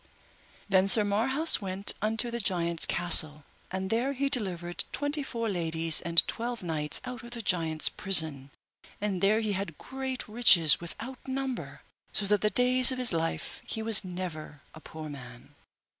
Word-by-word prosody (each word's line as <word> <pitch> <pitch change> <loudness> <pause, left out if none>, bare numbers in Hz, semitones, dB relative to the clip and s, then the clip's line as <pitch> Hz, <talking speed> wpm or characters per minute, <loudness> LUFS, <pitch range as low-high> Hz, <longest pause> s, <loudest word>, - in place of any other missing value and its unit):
Then 190 -1 +2
Sir 210 +2 +5
Marhaus 260 +11 +2
went 195 +1 +1
unto 225 +3 -1
the 235 - -4
giant's 170 -5 -1
castle, 155 -4 +5 0.3
and 190 0 -5
there 245 +5 -1
he 275 +1 -2
delivered 180 -9 -2
twenty 290 +1 0
four 235 -4 -5
ladies 165 -4 +2
and 170 0 +3
twelve 235 -2 -5
knights 155 -3 0
out 250 -2 -7
of 240 - -11
the 240 -1 -7
giant's 165 -5 0
prison, 160 -8 +1 0.5
and 200 -3 -3
there 215 +3 +2
he 215 -2 -2
had 190 -5 -5
great 265 -1 -7
riches 195 -10 +4
without 240 +10 -9
number, 265 -1 -5 0.3
so 205 - -1
that 205 0 0
the 210 - +1
days 250 +4 +4
of 260 - -5
his 250 -5 +1
life 165 0 -4
he 220 - -6
was 220 -2 +2
never 175 -5 -8 0.2
poor 160 -1 -9
man. 125 -4 -12
195 Hz, 160 wpm, -27 LUFS, 170-240 Hz, 0.5 s, Sir